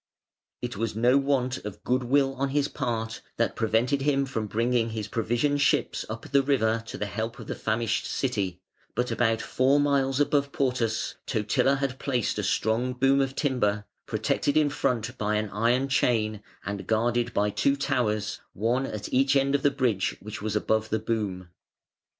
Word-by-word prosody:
It 120 -4 -4
was 115 0 -2
no 125 +5 +4
want 130 -2 0
of 105 -2 -8
good 130 +1 +1
will 135 +2 +2
on 135 +1 -1
his 145 +1 +1
part 115 -6 -3 0.2
that - - 0
prevented 115 +5 +1
him 140 -1 +2
from 115 -5 -3
bringing 115 +2 +1
his 110 -2 -4
provision 120 +6 0
ships 145 - +1
up - - -7
the 140 0 +5
river 115 -5 +1
to - - -6
the 105 - -2
help 110 +4 -4
of - - -9
the - - -4
famished 110 0 -1
City, 100 -9 -1 0.4
but 125 0 0
about 115 -2 +1
four 135 +3 +3
miles 140 -2 +2
above 145 -1 +2
Portus 125 -5 0
Totila 115 +4 +2
had 135 -1 -2
placed 125 -6 -1
a - - -1
strong 110 +5 +1
boom 135 +2 +3
of 135 0 -1
timber, 105 -8 0 0.2
protected 145 +1 0
in 150 -2 +3
front 120 -5 -1
by 105 0 0
an 105 -1 -1
iron 120 +5 +2
chain 110 -6 +1 0.2
and 100 -1 -4
guarded 120 +2 +1
by 105 0 +1
two 140 +6 +2
towers, 125 -7 -1
one 120 +6 0
at 105 -1 -6
each 135 +2 +3
end 135 0 +3
of 140 - +2
the 145 - +4
bridge 125 -8 0
which 105 0 -8
was 110 0 -2
above 110 +1 +1
the 110 - +1
boom. 105 -5 -3
120 Hz, 180 wpm, -27 LUFS, 110-135 Hz, 0.4 s, the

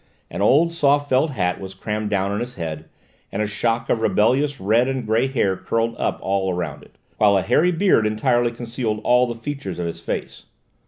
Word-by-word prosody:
An 85 - -4
old 150 +11 +4
soft 145 -3 +2
felt 130 +5 +3
hat 90 -9 -1
was 95 0 -8
crammed 105 +2 -3
down 100 -1 0
on 100 - -2
his 120 +1 -5
head, 80 -3 -5 0.5
and 100 - -4
a 105 - +1
shock 115 +2 -1
of 115 - 0
rebellious 130 +7 +2
red 115 +6 +2
and 130 -3 -2
grey 110 +4 +2
hair 115 -8 0
curled 115 +4 -1
up - - -1
all 95 -1 0
round 90 -1 -4
it, - - -19 0.2
while 100 -2 +4
a 95 - 0
hairy 160 +9 +3
beard 165 - +3
entirely 120 +3 +1
concealed 115 -2 -3
all 125 0 +4
the 120 - -4
features 135 -4 -6
of 90 - -3
his 85 - -5
face. - - -5
115 Hz, 205 wpm, -22 LUFS, 100-130 Hz, 0.5 s, old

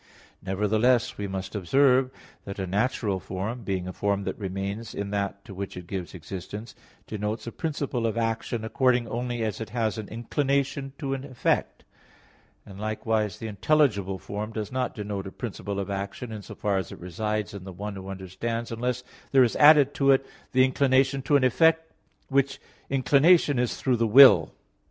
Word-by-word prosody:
Nevertheless, 110 +6 +1
we 100 - -2
must 95 -1 -5
observe 130 +6 +3 0.4
that 100 - -6
a 95 - -2
natural 100 0 0
form, 100 +7 -4
being 95 -4 -3
a 95 - -5
form 100 +1 -1
that - - -3
remains 100 +3 -4
in 100 0 -4
that 100 -1 -3
to 100 - -9
which 95 0 -6
it 90 - -7
gives 95 0 -5
existence, 100 +5 -7 0.3
denotes 105 +1 -4
a 115 - -5
principle 140 -7 -2
of 115 - -3
action 115 0 -2
according 125 0 +2
only 120 0 -3
as 110 -1 -3
it 110 - -5
has 115 -2 -1
an 105 - -6
inclination 135 +3 -1
to 135 -3 -3
an 135 -1 -4
effect; 130 -3 -1 0.8
and 100 -1 -11
likewise, 110 -1 -1
the - - -7
intelligible 105 -4 +1
form 105 +4 -5
does 110 -2 -5
not 130 0 -2
denote 100 -2 -4
a - - -7
principle 100 -3 -5
of 100 0 -3
action 100 +4 -5
in 110 -1 -6
so - - -10
far 100 -1 0
as 95 - -6
it - - -8
resides 105 +4 -3
in 100 -2 -8
the 95 - -8
one 100 +3 -6
who 95 0 -8
understands 95 +5 -4
unless 125 +2 -2 0.3
there 135 -1 +6
is 120 - +1
added 145 -2 +7
to 140 -1 +2
it 135 0 +4 0.3
the 130 0 +5
inclination 135 0 +2
to 145 +2 +2
an 140 - +4
effect, 160 +5 +3 0.4
which 140 0 +1 0.3
inclination 140 +2 +4
is 125 -1 0
through 130 -2 +1
the 115 0 +2
will. 105 - +8
110 Hz, 180 wpm, -26 LUFS, 100-130 Hz, 0.8 s, will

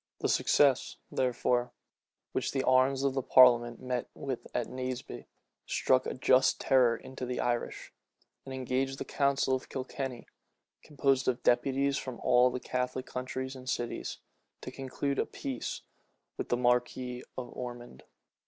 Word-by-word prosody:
The - - 0
success, 140 -3 +3
therefore, 125 -1 0 0.6
which - - -2
the 135 -1 0
arms 130 +1 +3
of 140 -1 +2
the 135 - 0
parliament 120 -2 +6
met 125 -1 -3
with 135 -3 -5
at - - -1
Naseby, 130 0 -5 0.4
struck 130 0 +2
a - - -3
just 130 0 +4
terror 125 -4 +4
into 130 +1 -9
the 125 0 -3
Irish; 120 -1 -2 0.5
and 135 - -9
engaged 130 +1 -1
the - - -5
council 140 -2 +1
of 130 - -2
Kilkenny, 130 -1 -5 0.6
composed 135 -3 +1
of 125 -1 0
deputies 135 +3 +2
from 130 -3 -7
all 125 0 +5
the 125 +1 -4
Catholic 125 +1 -2
counties 130 +1 -4
and 130 0 -8
cities, 120 -2 -3 0.4
to - - -7
conclude 135 +1 -3
a - - +2
peace 130 -3 -5 0.5
with - - -5
the 120 - +2
marquis 125 0 0
of 125 -2 -6
Ormond. 120 - -7
130 Hz, 145 wpm, -30 LUFS, 125-130 Hz, 0.6 s, parliament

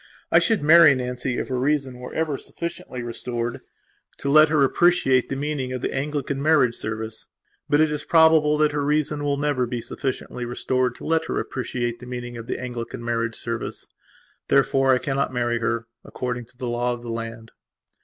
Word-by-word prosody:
I - - +7
should 225 -8 +1
marry 155 -1 +8
Nancy 125 0 -3
if - - -3
her 130 -1 -1
reason 135 -2 0
were 125 - -8
ever 160 -3 0
sufficiently 170 -5 -6
restored 120 0 -3 0.6
to 140 - -2
let 155 +1 +7
her 150 -2 +3
appreciate 135 -4 +3
the 135 - -2
meaning 140 -2 -3
of 125 - -4
the - - -1
Anglican 140 0 -2
marriage 150 -6 +4
service. 110 -1 -4 0.4
But 145 +1 +4
it 155 -1 +3
is 150 0 -3
probable 160 -2 +5
that 150 0 +3
her 145 -1 -1
reason 150 0 0
will 140 -1 0
never 140 -4 0
be 120 0 -3
sufficiently 125 +1 -4
restored 125 +1 -1
to - - -11
let 160 0 +1
her - - -2
appreciate 120 -2 -3
the 125 - -11
meaning 120 -1 -6
of 115 -1 -8
the - - -2
Anglican 120 -1 -6
marriage 115 -1 -1
service. 115 -1 -4 0.6
Therefore 135 0 +3
I 130 - +5
cannot 135 0 -1
marry 120 -1 0
her, 115 0 -1 0.2
according 125 -1 -4
to 120 +2 -25
the 125 - -5
law 120 +1 0
of 120 0 -8
the 120 - -5
land. 115 0 -6
130 Hz, 190 wpm, -23 LUFS, 120-150 Hz, 0.6 s, marry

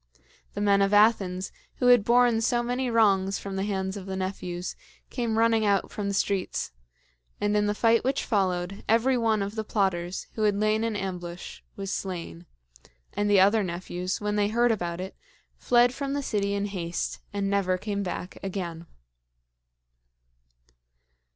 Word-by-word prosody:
The 205 - -2
men 200 -1 +4
of 195 +1 +3
Athens, 195 -4 +3 0.2
who 250 - -2
had 245 -4 +7
borne 240 0 +4
so 240 +1 +1
many 250 +1 -1
wrongs 200 -4 +3
from 195 -1 -6
the 190 - -1
hands 190 -1 -2
of 195 -1 -8
the 190 - -3
nephews, 185 -2 -4 0.4
came 235 -3 -1
running 225 -1 +3
out 200 -2 +1
from 205 -1 -3
the 200 - -1
streets; 190 - -1 0.7
and 205 0 +1
in 210 0 +2
the 205 - 0
fight 230 +1 +3
which 270 +2 0
followed, 190 -3 -1
every 230 +4 +3
one 225 -4 +1
of 200 +1 -4
the 220 -1 -3
plotters, 190 -4 -1
who 220 - -5
had 210 -1 +3
lain 215 +2 +1
in 230 -2 -1
ambush 180 -3 -5 0.2
was 195 0 -4
slain; 165 - -5 0.7
and 205 0 0
the 200 -1 +5
other 205 +4 +5
nephews, 180 0 -3
when 210 0 -1
they 205 -1 +3
heard 235 +3 +2
about 175 -5 -2
it, 190 +1 -6 0.4
fled 245 0 +3
from 275 +1 -3
the 285 0 -2
city 200 -4 -1
in 200 0 -1
haste 175 -4 -3
and 200 -1 -2
never 195 -2 +1
came 200 +1 -3
back 180 -1 -5
again. 175 -4 -5
200 Hz, 170 wpm, -27 LUFS, 190-225 Hz, 0.7 s, had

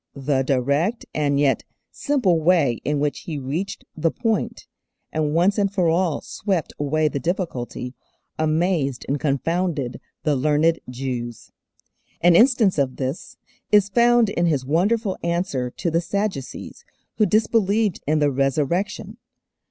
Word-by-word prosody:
The 135 -1 0
direct 140 - 0
and 145 -2 +1
yet 140 -2 +2 0.3
simple 245 - +1
way 155 -8 +3
in 150 0 0
which 145 0 -1
He 160 -3 -6
reached 150 +9 -4
the 165 +1 +1
point, 225 +5 -2 0.5
and 155 -1 -1
once 190 +5 +3
and 200 -1 +1
for 185 -4 +1
all 170 -2 +1
swept 190 -6 -3
away 155 +2 +1
the 145 - -2
difficulty, 130 -7 -3 0.5
amazed 155 -4 0
and 140 +1 -1
confounded 155 -1 -1 0.2
the 150 -2 +2
learned 155 +4 +2
Jews. 125 -2 -5 0.7
An 175 0 +5
instance 225 - +4
of 130 -2 0
this 140 - -5 0.3
is 205 -1 +5
found 235 0 +4
in 175 -2 +1
His 140 -5 0
wonderful 195 - +1
answer 170 -7 -1
to 170 +7 -3
the 165 +1 +2
Sadducees, 195 -7 -4 0.3
who 215 - +4
disbelieved 215 0 +2
in 155 +1 +2
the 145 -1 +2
Resurrection. 170 - -1
165 Hz, 135 wpm, -22 LUFS, 140-195 Hz, 0.7 s, An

